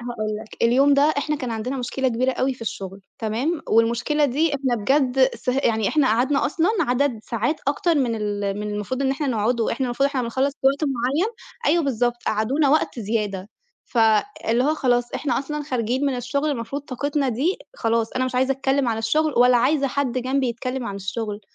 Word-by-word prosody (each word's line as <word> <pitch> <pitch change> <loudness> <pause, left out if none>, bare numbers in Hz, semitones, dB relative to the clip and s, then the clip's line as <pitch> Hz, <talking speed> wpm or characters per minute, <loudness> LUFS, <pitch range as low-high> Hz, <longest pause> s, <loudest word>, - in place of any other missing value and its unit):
هاقول 240 -3 -4
لك، 220 - -10
اليوم 270 +5 +5
ده 280 - +4 0.2
إحنا 300 +1 -1
كان 255 -4 -4
عندنا 230 +4 -3
مشكلة 260 +1 -1
كبيرة 255 +2 0
أوي 260 0 0
في 235 - -11
الشغل 195 -3 -6 0.2
تمام، 245 +9 -1
والمشكلة 235 +7 +2
دي 290 +3 +1
إحنا 265 -3 0
بجد 265 +2 +3
س - - -11
يعني 230 -5 +1
إحنا 295 -4 +2
قعدنا 255 +5 +2
أصلًا 330 +5 +1
عدد 250 -1 +1
ساعات 240 +7 -1
أكتر 330 +4 +1
من 255 -6 +1
ال 205 -1 -2
من 210 0 -3
المفروض 250 +6 -3
إن 265 - +2
إحنا 280 +2 -2
نقعده، 230 -1 0
إحنا 260 +2 -1
المفروض 250 +3 +1
إحنا 270 -3 -2
بنخلّص 260 +4 0
في 270 - +2
وقت 280 +3 +2
معيّن 280 - 0 0.3
أيوه 335 0 +3
بالضبط، 240 -2 0
قعدونا 260 +8 +1
وقت 295 -4 +1
زيادة 205 -3 -2 0.4
ف 240 - -4 0.5
اللي 240 +3 +3
هو 305 +2 +2
خلاص 245 -3 +1
إحنا 290 - 0
أصلًا 300 +2 -4
خارجين 255 0 -1
من 265 -2 0
الشغل 280 +5 -1
المفروض 275 +2 -4
طاقتنا 285 +1 -2
دي 280 - 0 0.2
خلاص 225 -1 0
أنا 255 0 0
مش 255 -1 -4
عايزة 260 +1 +2
أتكلّم 270 -1 0
عن 225 -1 -1
الشغل 305 +7 +1
ولا 250 0 +6
عايزة 275 +4 +2
حد 260 -2 -1
جنبي 260 +1 0
يتكلّم 250 +1 -4
عن 200 - -4
الشغل، 205 +2 -4
255 Hz, 195 wpm, -23 LUFS, 230-280 Hz, 0.5 s, ولا